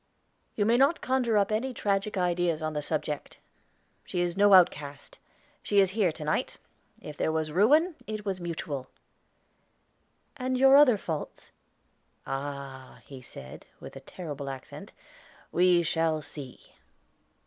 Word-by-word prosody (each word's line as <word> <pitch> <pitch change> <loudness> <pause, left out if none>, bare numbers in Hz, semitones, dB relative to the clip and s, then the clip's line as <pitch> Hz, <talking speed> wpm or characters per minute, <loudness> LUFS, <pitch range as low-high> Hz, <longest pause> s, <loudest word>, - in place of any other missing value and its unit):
"You 205 - +1
may 230 +2 +3
not 275 +6 +3
conjure 250 -4 +1
up 200 0 +2
any 245 +4 -1
tragic 200 0 -1
ideas 175 -3 0
on 155 0 -2
the 150 - -2
subject. 150 -1 -4 0.7
She 180 - -4
is 175 -1 -1
no 205 0 +5
outcast. 145 -6 +2 0.4
She 205 - +2
is 190 -2 +4
here 200 -4 +1
to 155 - -8
night; 150 - -2 0.4
if 150 - -9
there - - 0
was 155 -1 -2
ruin, 295 - +4
it 215 -1 -5
was 190 -2 -3
mutual." 155 -6 -5 1.5
"And 255 -2 -2
your 270 +1 +6
other 280 -6 +7
faults?" 160 -6 -6 0.7
"Ah!" 135 -1 -6
he 135 -2 -11
said, 65 - -11
with - - -11
a - - -7
terrible 145 -6 -7
accent, 135 -1 -9 0.6
"we 175 0 +4
shall 160 -1 0
see." 140 -3 -11
175 Hz, 140 wpm, -28 LUFS, 150-215 Hz, 1.5 s, other